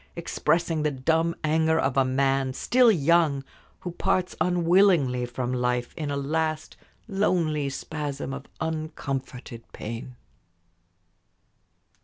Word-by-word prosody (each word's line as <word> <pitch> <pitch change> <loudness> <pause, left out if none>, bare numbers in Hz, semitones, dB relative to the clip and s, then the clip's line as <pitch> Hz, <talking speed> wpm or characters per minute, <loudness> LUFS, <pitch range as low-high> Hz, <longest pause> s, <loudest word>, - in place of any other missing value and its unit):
expressing 165 -1 0
the 150 - +2
dumb 160 +5 0
anger 160 +1 +2
of 135 -2 0
a 135 - +4
man, 135 0 +1
still 245 - +4
young, 160 -4 +2 0.4
who 180 - -5
parts 180 +1 0
unwillingly 175 -8 +3
from 125 +1 -3
life 125 -1 -1
in 155 -3 -4
a 140 - -1
last 155 +2 -2 0.3
lonely 170 -8 0
spasm 145 -1 -5
of 140 0 -8
uncomforted 140 -6 -4
pain. 115 +3 -7
150 Hz, 110 wpm, -26 LUFS, 135-165 Hz, 0.4 s, a